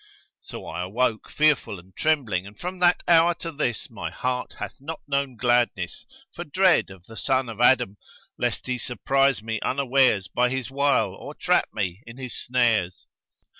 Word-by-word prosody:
So - - -9
I 85 - -5
awoke, 110 +5 -1
fearful 150 -9 +2
and 90 +2 -17
trembling 115 -12 0
and 100 +1 -14
from 180 +1 -5
that 175 -1 +4
hour 170 0 +5
to 165 - -6
this 135 -7 -2
my - - -6
heart 125 0 -3
hath - - -6
not 160 +3 -6
known 140 -2 -1
gladness, 120 -7 0 0.3
for - - -5
dread 185 - +3
of 95 -2 -14
the 115 - -13
son 130 +2 +1
of 115 +1 -6
Adam, 125 -5 +4 0.4
lest - - -2
he 125 -1 -2
surprise 135 0 +1
me 110 -1 -2
unawares 130 -7 +2
by 125 +4 +1
his 130 -2 -3
wile 140 -8 +2
or - - -9
trap - - +2
me 90 +2 -3
in 115 +1 -10
his 130 -2 -6
snares. 115 -8 0
125 Hz, 170 wpm, -25 LUFS, 110-140 Hz, 0.4 s, hour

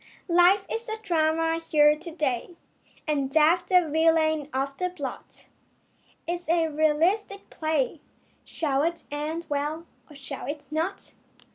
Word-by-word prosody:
Life 360 +3 +5
is 460 0 -4
the 440 0 -3
drama 325 -2 +1
here 300 -2 +4
to 330 +3 -9
day 300 0 -2 0.5
And 280 -3 0
Death 315 +4 +3
the 360 -3 +4
villain 315 -1 +2
of 270 +1 -2
the 365 0 0
plot. 290 -8 -8 0.8
It 340 - -1
is 350 -1 -7
a 330 -1 +2
realistic 325 +7 0
play. 310 -1 -1 0.4
Shall 280 -4 -1
it 335 +2 -1
end 310 +3 -3
well 295 +3 -2 0.2
or 295 - -14
shall 275 -1 -7
it 290 +1 -5
not? 330 +6 -3
315 Hz, 140 wpm, -26 LUFS, 295-345 Hz, 0.8 s, Life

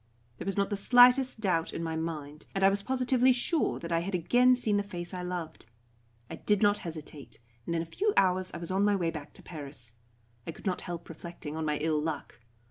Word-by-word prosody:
There 175 - -6
was 195 - -1
not 200 +1 +1
the 205 - 0
slightest 245 +3 +6
doubt 175 -5 0
in 165 - -4
my 160 -1 -2
mind, 155 -2 -5
and 195 - 0
I 195 - +8
was 200 +1 0
positively 255 +1 +2
sure 255 +6 +1
that 170 - -7
I 165 - +3
had 185 +3 -3
again 245 +9 +4
seen 220 -4 +1
the - - +2
face 175 -3 -6
I 180 - -4
loved. 180 -8 -5 0.6
I - - -7
did 210 0 +1
not 205 0 +4
hesitate, 155 -4 -7 0.3
and 170 - -1
in 165 - 0
a - - -8
few 405 - 0
hours 185 0 +3
I - - -6
was 170 +1 -5
on 190 +2 +2
my 205 0 +3
way 170 -4 0
back 150 -3 -8
to - - -11
Paris. 140 -8 -5 0.5
I 165 - -4
could - - -15
not 185 -2 -1
help 170 -2 -6
reflecting 165 -2 -8
on 160 0 -2
my 150 -1 0
ill 155 0 0
luck. 150 -5 -5
180 Hz, 230 wpm, -29 LUFS, 160-205 Hz, 0.6 s, I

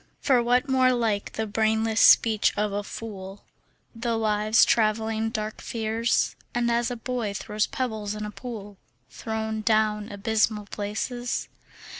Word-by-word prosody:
For 255 -3 +3
what 245 +3 +2
more 260 -1 +4
like 225 -4 -1
the 220 - -2
brainless 220 +1 +1
speech 220 -2 +5
of 210 0 0
a 205 +1 -2
fool, 200 -2 -8 0.5
The 230 0 -1
lives 215 0 +3
travelling 220 0 +1
dark 215 -2 -4
fears, 230 0 0 0.2
And 240 0 +1
as 235 +1 +1
a 245 - -3
boy 230 -3 -3
throws 210 +1 -1
pebbles 220 -5 -3
in 210 0 -4
a 210 - -6
pool 210 -4 -8 0.3
Thrown 220 -1 -3
down 215 -1 +1
abysmal 210 +1 0
places? 215 +5 -3
220 Hz, 140 wpm, -26 LUFS, 210-235 Hz, 0.5 s, speech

